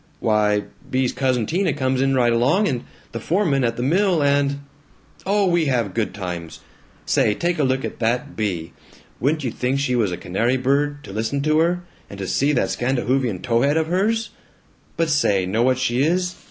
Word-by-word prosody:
"Why, 105 -1 +2 0.3
Bea's 130 -1 0
cousin 130 -4 0
Tina 175 - 0
comes 130 -2 0
in 135 0 +2
right 120 -2 +3
along, 140 - +2
and 125 -5 -2 0.3
the 115 - -5
foreman 155 - +1
at 115 -1 0
the 120 - -2
mill, 175 +2 +2
and 140 0 +1 0.7
Oh, 200 0 +2
we 175 -3 +2
have 120 -8 0
good 110 -3 -1
times. 90 -4 -6 0.4
Say, 105 - +2
take 175 +4 -1
a - - +3
look 130 0 0
at - - -7
that 125 +5 -1
Bea! 90 -6 -3 0.5
Wouldn't 150 +4 0
you 125 - -1
think 130 +4 -1
she 130 -3 0
was 110 -6 +1
a 90 - -3
canary 115 +8 0
bird, 145 +3 0
to 95 - -9
listen 115 +6 -1
to 155 +2 +2
her, 175 +2 +1 0.3
and 100 - -9
to 100 - -4
see 140 +9 +1
that 130 - +1
Scandahoofian 125 -4 -1
tow 115 -1 +1
head 145 +3 +2
of 160 - +2
hers? 220 +6 0 0.7
But 165 - +1
say, 100 -11 +2
know 100 +5 0
what 130 +1 +3
she 130 -1 0
is? 180 +4 +1
130 Hz, 195 wpm, -21 LUFS, 115-150 Hz, 0.7 s, right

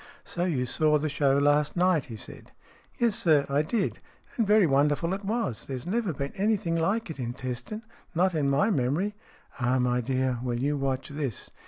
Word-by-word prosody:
" - - -29
So 175 0 0
you 140 -8 0
saw 150 +4 +2
the 155 +1 -1
show 140 -1 +2
last 145 +3 +2
night," 180 -5 +3
he 115 - -8
said. 105 - -10 0.2
" - - -30
Yes, 235 -2 +2
sir, 150 -4 +3
I 140 +1 +2
did. 190 +7 -1 0.4
And 225 -4 +1
very 210 -1 +6
wonderful 150 +4 +2
it 195 +1 -4
was. 200 - -2
There 135 - -3
has 125 - -7
never 210 +1 0
been 140 -1 -4
anything 200 -4 +1
like 195 +4 0
it 150 - -9
in 120 -1 -3
Teston, 130 - -5 0.3
not 185 +2 +3
in 145 -3 +1
my 145 +11 +3
memory." 155 +7 0 0.3
" - - -23
Ah, 125 +2 +2
my 125 0 +1
dear. 130 0 0
Well, 120 -1 -2
you 140 +4 0
watch 135 -1 -2
this." 140 -6 -4
145 Hz, 210 wpm, -27 LUFS, 130-185 Hz, 0.4 s, very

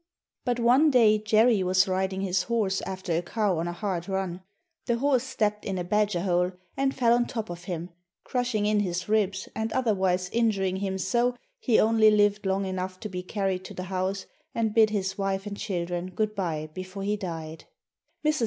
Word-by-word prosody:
But 245 -1 0
one 255 +6 +5
day 225 -5 +5
Jerry 215 0 +4
was 185 +1 +3
riding 190 0 -1
his 185 -1 +1
horse 210 -3 0
after 185 -3 -3
a 170 - +1
cow 195 -1 0
on 170 - -2
a - - -2
hard 180 -1 -3
run. 190 -2 -2 0.5
The 235 - +2
horse 270 0 +2
stepped 210 -5 -1
in 195 -2 -3
a 180 - -2
badger 205 -1 +1
hole 180 -1 +1 0.2
and 270 0 0
fell 235 -2 +4
on 240 0 +2
top 220 -6 -4
of 175 0 -8
him, 175 -1 -5 0.3
crushing 245 -5 -1
in 210 0 +2
his 180 -3 -2
ribs 200 -3 +1
and 220 0 -2
otherwise 190 -7 +1
injuring 195 -5 +1
him 190 -1 -2
so 240 +6 +1 0.2
he 245 - +3
only 220 0 +5
lived 205 -1 +3
long 195 +1 0
enough 185 0 -4
to 215 - -5
be 180 -1 -4
carried 190 -1 -2
to - - -9
the 185 - -4
house 190 +1 -1 0.3
and 225 -2 0
bid 220 -1 +5
his 200 -2 -2
wife 195 0 -1
and 205 -1 -5
children 175 -4 -3
good 215 +4 -1
bye 160 -6 -3
before 185 +2 -6
he 205 +1 0
died. 165 -5 -6 0.6
Mrs. 305 0 +2
195 Hz, 195 wpm, -27 LUFS, 185-220 Hz, 0.6 s, one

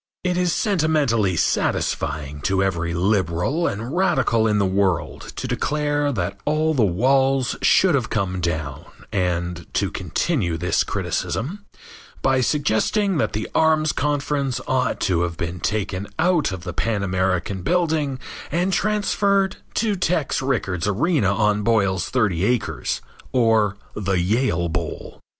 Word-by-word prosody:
It 180 -1 0
is 180 -1 +1
sentimentally 150 - +1
satisfying 75 -2 -1
to 95 +3 +1
every 85 -3 -1
liberal 95 - +1
and 115 +9 -4
radical 135 -11 +2
in 105 -1 +2
the 100 - +2
world 95 -2 -1
to - - -4
declare 145 0 0
that 100 -3 -3
all 155 +1 +1
the 130 -6 +2
walls 130 +7 +2
should 185 -3 +4
have 130 -5 0
come 95 -4 -1
down 80 -5 -3 0.3
and 90 -2 -2
to - - +1
continue 100 - -1
this 90 +3 +1
criticism 195 - -3 0.6
by 135 -1 +3
suggesting 150 - +1
that - - 0
the 110 - -2
Arms 155 -1 +3
conference 140 -2 -1
ought 130 -1 0
to 85 -3 +1
have 85 -1 -2
been 85 +1 -4
taken 100 +1 -2
out 170 - +2
of 95 -2 -6
the 90 -1 -5
Pan 105 +1 -1
American 95 0 -1
Building 155 - 0 0.3
and 180 +5 +1
transferred 200 -2 +1 0.2
to 215 -2 +1
Tex 170 -7 0
Rickard's 105 -10 -1
arena 110 - +2
on 105 0 +2
Boyle's 100 -5 +1
Thirty 105 -9 +1
Acres, 120 +2 -1 0.3
or 110 -5 +2 0.2
the 100 -2 -2
Yale 95 -2 +1
Bowl. 80 - -5
110 Hz, 135 wpm, -22 LUFS, 95-150 Hz, 0.6 s, should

